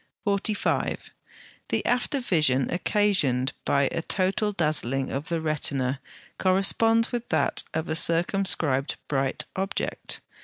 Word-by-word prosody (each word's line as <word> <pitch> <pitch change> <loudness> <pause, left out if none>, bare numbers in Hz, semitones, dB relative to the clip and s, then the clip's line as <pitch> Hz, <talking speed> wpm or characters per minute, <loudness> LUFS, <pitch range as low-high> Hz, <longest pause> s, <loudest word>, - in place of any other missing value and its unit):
45. 200 0 -1 0.6
The - - -1
after 250 +3 +1
vision 150 - +2
occasioned 175 - +1
by 140 0 +2
a - - -2
total 195 +4 0
dazzling 150 -7 -1
of 140 +3 -4
the 170 -1 -1
retina 140 -4 -1 0.4
corresponds 225 +5 +3
with 240 -1 -4
that - - +2
of 160 +1 -2
a 155 - -2
circumscribed 165 -5 +2
bright 135 -2 -1
object. 195 +1 -3
170 Hz, 115 wpm, -26 LUFS, 140-200 Hz, 0.6 s, corresponds